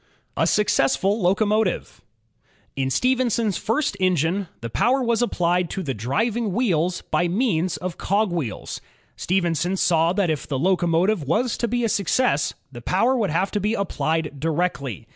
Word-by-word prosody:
A - - +1
Successful 205 +1 +2
Locomotive 205 +2 0 0.7
In 135 -1 -1
Stephenson's 235 - +1
first 235 - -1
engine, 185 +1 +1
the 115 - -5
power 250 - +2
was 235 -1 +1
applied 180 -6 +1
to 190 - -4
the 135 -5 -2
driving 205 - -1
wheels 180 -6 0
by 175 - +2
means 185 -3 0
of 180 -1 -6
cogwheels. 175 - -2 0.3
Stephenson 175 0 0
saw 165 -2 +3
that 190 -4 +1
if 150 - -4
the 140 - -2
locomotive 175 +4 +2
was 230 - 0
to 235 - -1
be 240 +1 -1
a - - +2
success, 200 - +1 0.2
the 120 -2 -9
power 215 - +2
would 225 -6 0
have 180 +5 0
to 210 - -1
be 210 +3 0
applied 160 -7 -2
directly. 150 - -2
185 Hz, 150 wpm, -23 LUFS, 165-220 Hz, 0.7 s, saw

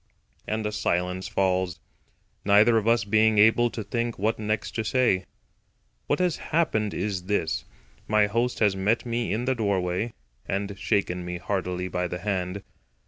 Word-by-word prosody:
And 110 0 -2
a 105 - -1
silence 90 -3 -1
falls, 95 -2 0 0.6
neither 105 +3 +5
of 110 - -5
us 115 -3 +4
being 110 +2 +3
able 115 +3 +5
to 115 -1 -5
think 115 +3 -2
what 110 +3 0
next 105 0 -2
to 110 - -2
say. 110 -5 +1 0.8
What 145 - +2
has 180 -3 +1
happened 110 -11 0
is 95 -4 -2
this: 80 -11 -1 0.4
My 105 -1 +4
host 115 +4 0
has 105 -3 +4
met 105 +6 +1
me 120 0 -1
in 115 +4 -1
the 130 - +2
doorway, 100 -1 -1 0.3
and 100 +1 -2
shaken 90 -4 0
me 90 0 -4
heartily 90 -1 -2
by 90 0 -2
the 90 - -4
hand. 95 0 -3
105 Hz, 160 wpm, -26 LUFS, 95-110 Hz, 0.8 s, neither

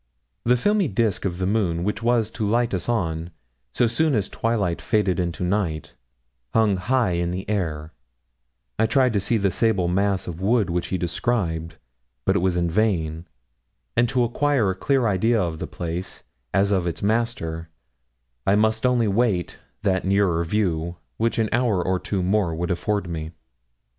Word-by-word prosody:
The 125 +1 +4
filmy 205 - +2
disk 105 -2 0
of 90 -2 -1
the 95 - -1
moon 90 -5 0
which 105 +4 -2
was 115 -2 +2
to 105 - -2
light 120 +1 +1
us 95 +3 -2
on, 85 -7 -1 0.4
so 120 - +2
soon 145 +5 +2
as 100 -3 0
twilight 105 -7 -1
faded 100 -5 +1
into 85 -1 -2
night, 90 -5 -1 0.6
hung 110 -4 +3
high 120 +2 +1
in 85 +2 -2
air. 80 -7 -2 0.9
I 110 - +4
tried 130 -1 +3
to 100 - +2
see 115 +4 +1
the 100 -2 +1
sable 100 -3 +1
mass 95 +2 +1
of 90 0 -6
wood 105 -2 +2
which 85 0 -1
he 95 - -1
described. 85 -3 -1 0.5
But - - +3
it - - +3
was 90 0 +1
vain, 85 -2 0 0.7
and 120 0 +3
to 130 -2 +2
acquire 120 -3 +1
a - - -4
clear 135 +5 +1
idea 110 +3 +2
of 85 -4 -2
the - - -4
place, 85 +2 -5 0.3
as 100 +1 +2
of 95 -3 +1
its 85 - -4
master, 100 -7 -1 0.8
I 95 - +5
must 110 +3 +2
only 120 -3 +2
wait 100 -4 0 0.2
that 95 -3 +1
nearer 95 -3 +2
view 85 -2 -1 0.2
which 115 +1 0
an 110 -1 +2
hour 120 -5 +2
or 95 +1 0
two 95 -1 -2
more 95 -3 +1
would 85 +3 -2
afford 100 +2 -1
me. 80 -1 -5
100 Hz, 170 wpm, -23 LUFS, 85-115 Hz, 0.9 s, I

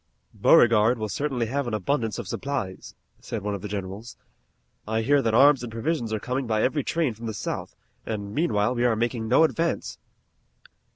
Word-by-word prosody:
"Beauregard 115 +1 +5
will 110 -1 -3
certainly 135 -1 -1
have 135 +3 -2
an 115 - -1
abundance 115 +2 -1
of 120 -6 -6
supplies," 100 -7 -4 0.2
said 110 -4 -5
one 105 0 -2
of 100 - -5
the 105 - -5
generals. 100 +3 -6 0.7
"I 110 +1 0
hear 145 +4 +3
that 115 -3 +1
arms 140 +2 +6
and 120 -2 -6
provisions 115 0 -2
are 110 - -1
coming 130 +3 -3
by 110 -1 +1
every 145 +2 +1
train 160 -5 0
from 115 +2 -8
the 110 - -4
South, - - -5 0.3
and 100 -2 -5
meanwhile 120 -7 +1
we 120 -1 -1
are 120 -2 +3
making 115 0 -1
no 130 +8 +5
advance." 165 +1 -1
115 Hz, 185 wpm, -25 LUFS, 110-135 Hz, 0.7 s, arms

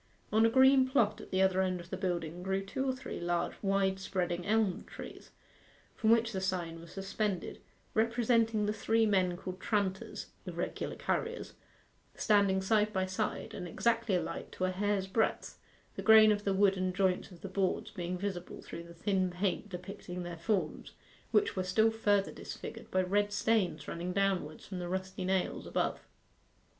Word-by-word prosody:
On 220 +1 +6
a - - +2
green 265 +2 +6
plot 220 -6 +2
at - - -11
the 190 0 +2
other 190 0 +3
end 185 -1 0
of 175 0 -11
the - - -1
building 175 -2 -2
grew 190 +1 -1
two 265 +7 -2
or - - +3
three 260 0 -6
large, 175 0 -1
wide 195 -1 +1
spreading 180 -2 -2
elm 215 -3 +2
trees, - - -10 0.7
from 220 - +1
which 230 0 +4
the 190 -3 -3
sign 175 -3 -2
was 170 0 -12
suspended 195 -1 -3 0.3
representing 230 -1 +2
the 210 - 0
three 225 +1 +2
men 185 -4 +2
called 185 0 -6
tranters 200 -3 -1 0.2
(irregular - - -3
carriers), 465 +1 -2 0.6
standing 200 -3 +3
side 210 +1 +3
by 190 -2 0
side, 190 +3 -3
and 180 -2 -5
exactly 230 +2 +1
alike 180 - -3
to 185 - -2
a 185 - 0
hair's 200 +1 0
breadth, 190 +4 -1 0.3
the - - -5
grain 220 -1 +8
of 205 0 -1
the 200 - +2
wood 195 0 +4
and 185 0 -1
joints 190 -2 +1
of 180 -3 -14
the - - -5
boards 195 +2 -1
being 180 -1 -3
visible 185 -2 -4
through 170 - -8
the 170 0 -12
thin 185 +1 +1
paint 190 +3 -2
depicting 180 -1 -6
their 175 -1 -5
forms, 170 -2 -2 0.4
which 410 - +2
were 185 - 0
still 220 +5 +3
further 205 -3 +2
disfigured - - -8
by 185 0 +2
red 205 +3 +1
stains 195 -8 +1
running 175 +2 -3
downwards 190 -6 0
from 185 -2 -6
the 175 -1 -4
rusty 190 0 -3
nails 190 0 -1
above. - - -1
190 Hz, 175 wpm, -32 LUFS, 180-215 Hz, 0.7 s, grain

